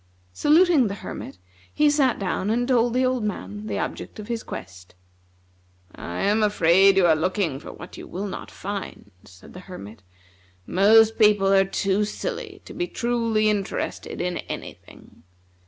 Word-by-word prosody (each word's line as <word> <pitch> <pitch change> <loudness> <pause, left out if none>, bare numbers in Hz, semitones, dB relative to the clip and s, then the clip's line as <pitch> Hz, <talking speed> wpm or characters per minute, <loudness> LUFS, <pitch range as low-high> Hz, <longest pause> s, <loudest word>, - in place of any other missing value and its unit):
Saluting 310 - +4
the 200 - -4
Hermit, 135 - -8 0.3
he 300 - +2
sat 285 -4 +3
down 195 0 -2
and 240 +2 0
told 240 -2 +2
the 255 0 +3
old 255 -2 0
man 105 - -5
the 100 -2 -3
object - - -5
of 210 +1 -9
his 230 -1 -2
quest. 90 -1 -10 1.0
"I 85 - -6
am 210 +2 +2
afraid 195 -1 +4
you 190 - +5
are 160 -2 +5
looking 165 -3 -1
for - - -10
what 175 - -11
you - - -9
will 195 +3 -5
not 195 - -6
find," 200 0 -7
said 90 +1 -16
the 180 - -9
Hermit. 115 - -11 0.6
"Most 220 +4 +4
people 205 -2 +4
are 195 0 +5
too 195 +1 0
silly 435 - -5
to - - -10
be 355 - -2
truly 230 -5 0
interested 205 -2 -2
in 180 0 -2
any - - -6
thing. - - -19
205 Hz, 165 wpm, -24 LUFS, 180-235 Hz, 1.0 s, you